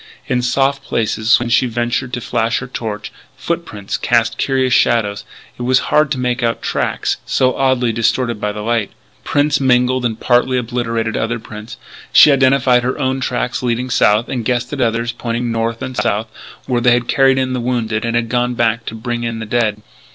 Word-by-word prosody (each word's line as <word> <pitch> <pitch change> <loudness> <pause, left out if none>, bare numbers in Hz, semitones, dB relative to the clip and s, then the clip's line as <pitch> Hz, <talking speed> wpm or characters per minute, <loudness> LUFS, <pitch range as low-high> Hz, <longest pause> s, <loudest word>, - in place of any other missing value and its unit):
In 125 -1 0
soft 135 +2 +1
places, 110 -2 +1
when 120 0 -3
she 120 +2 +3
ventured 120 +2 -2
to 125 - -3
flash 115 0 0
her 125 - -4
torch, 110 -4 -5 0.3
foot 170 +5 -3
prints 100 -2 -5
cast 115 -2 +1
curious 130 -2 +1
shadows, 110 -5 +2 0.3
and - - -3
it - - -3
was 130 0 +4 0.2
hard 150 -1 +4
to 135 - -1
make 125 0 -1
out 115 -1 -1
tracks - - -1
so 130 -1 +1
oddly 130 -3 +1
distorted 115 0 0
by 105 - -1
the 105 0 -6
light. 115 -2 0 0.3
Prints 145 +1 +1
mingled 125 -1 +2
and 115 -2 -2
partly 125 +1 +2
obliterated 115 -2 -2
other 115 +2 -1
prints. 110 0 -10 0.3
She 150 - +8
identified 130 -2 +3
her 125 +1 -2
own 130 -2 -1
tracks 125 0 -2
leading 125 +1 -1
south, 105 +2 +3
and 125 -3 -3
guessed 125 +3 -1
at 145 - -4
the 125 - +3
others, 115 +1 -2
pointing 120 0 -3
north 115 0 -2
and 130 - -5
south, 110 0 0 0.4
where 125 -2 0
they 125 0 +4
had 120 0 0
carried 135 -1 +3
in 130 -1 0
the 125 - -2
wounded 115 -3 -1
and 115 0 -1
had 120 -1 0
gone 125 +1 0
back 115 0 0
to 110 - -5
bring 120 +1 -4
in 115 -1 -3
the 110 - -5
dead. 105 -2 -1
120 Hz, 205 wpm, -17 LUFS, 115-130 Hz, 0.4 s, She